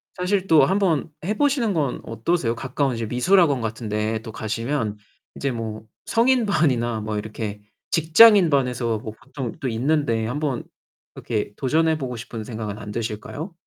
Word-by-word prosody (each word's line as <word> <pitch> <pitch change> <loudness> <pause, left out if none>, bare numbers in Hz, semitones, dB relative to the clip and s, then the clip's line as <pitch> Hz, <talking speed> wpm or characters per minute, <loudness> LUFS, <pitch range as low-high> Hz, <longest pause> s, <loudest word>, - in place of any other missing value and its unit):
사실 190 +1 0
또 160 -2 +6
한번 185 -6 +1 0.2
해 210 - 0
보시는 265 -8 +2
건 145 -6 -1
어떠세요? 115 +1 -1
가까운 135 0 -1
이제 115 0 -3
미술학원 140 - +3
같은 110 0 -4
데 110 +1 -1
또 110 - -8
가시면 110 0 -2 0.4
이제 140 -1 -2
뭐 110 -2 -5 0.2
성인반이나 160 - +2
뭐 105 0 -3
이렇게 105 -1 -5 0.3
직장인 175 +3 +7
반에서 125 -5 +1
뭐 110 0 -7
보통 135 -3 -5
또 135 - -3
있는데 115 -2 0
한번 140 -1 -2 0.5
이렇게 105 -2 -3
도전해 160 +4 +1
보고 125 -4 -4
싶은 115 -1 -7
생각은 110 -2 -5
안 105 -1 -8
드실까요? 115 - -5
125 Hz, 330 characters per minute, -23 LUFS, 110-160 Hz, 0.5 s, 직장인